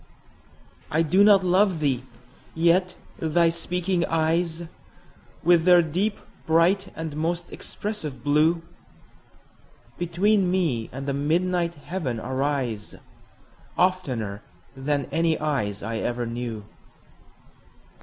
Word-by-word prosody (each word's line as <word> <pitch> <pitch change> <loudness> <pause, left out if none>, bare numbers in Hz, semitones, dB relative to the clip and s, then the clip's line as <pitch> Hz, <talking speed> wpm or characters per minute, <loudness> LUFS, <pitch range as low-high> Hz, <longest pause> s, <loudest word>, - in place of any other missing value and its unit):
I 160 +2 +2
do 185 +6 +4
not 200 -2 +6
love 185 -1 +3
thee!—yet 145 +7 -1 0.2
thy 165 +1 +3
speaking 175 +1 -1
eyes, 165 +1 0 0.8
With 170 -1 +5
their 175 0 +6
deep, 190 +7 -1 0.3
bright, 170 +5 +3
and 160 -2 -5
most 170 +2 -2
expressive 205 -10 -6
blue, 155 +3 +3 1.4
Between 185 +3 +2
me 160 -12 0
and 135 +2 -6
the 140 - -1
midnight 170 +4 0
heaven 145 -6 -4
arise, 130 -3 -2
15 - - -15 0.8
Oftener 130 - 0 0.3
than 140 +1 -1
any 165 -1 +1
eyes 105 -10 -2
I 115 +2 -3
ever 120 +1 -2
knew. 115 -2 -5
160 Hz, 105 wpm, -25 LUFS, 135-180 Hz, 1.4 s, not